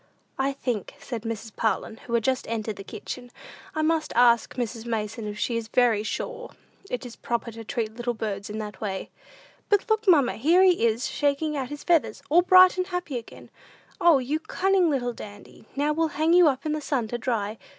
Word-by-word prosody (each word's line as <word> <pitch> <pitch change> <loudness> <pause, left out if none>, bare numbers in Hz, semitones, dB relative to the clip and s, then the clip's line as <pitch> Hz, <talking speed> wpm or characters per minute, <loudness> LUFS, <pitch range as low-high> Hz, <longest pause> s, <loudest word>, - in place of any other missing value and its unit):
"I 270 +1 +1
think," 245 -4 -4
said 250 -6 -5
Mrs. 225 -1 -6
Parlin, 220 0 -1
who 235 - -8
had 230 - +1
just 260 +1 0
entered 220 -2 -3
the 195 - -7
kitchen, 245 +5 -8 0.5
"I 310 - 0
must 315 0 +1
ask 235 -1 +4
Mrs. 235 -2 -3
Mason 220 0 -3
if 210 0 -5
she 235 +2 -1
is 230 -1 -4
very 235 -3 +3
sure 480 - -5 0.4
it 250 +1 -4
is 240 - -9
proper 235 0 -3
to 225 0 -9
treat 220 -1 -3
little 240 0 -2
birds 205 -2 -4
in 210 - -5
that 210 -2 -6
way." 195 -3 -4 0.6
"But 410 +1 +2
look, 440 -1 +1
mamma; 290 -9 +4
here 330 +10 +4
he 355 -11 +4
is, 230 +3 -1
shaking 290 +1 0
out 265 -3 -3
his 295 0 -7
feathers, 330 -4 +1
all 345 +3 +7
bright 370 +1 +7
and 365 0 -1
happy 355 -8 -3
again. 230 - -14 0.5
O, 340 -4 +6
you 270 +4 -1
cunning 375 +1 +1
little 245 -4 -1
Dandy, 205 -1 -12
now 290 +2 +1
we'll 325 +1 +1
hang 315 +2 +3
you 355 -2 +7
up 270 -1 0
in 305 - 0
the 305 0 -2
sun 265 -6 -1
to 240 - -3
dry. 225 -3 -2
250 Hz, 205 wpm, -26 LUFS, 225-310 Hz, 0.6 s, all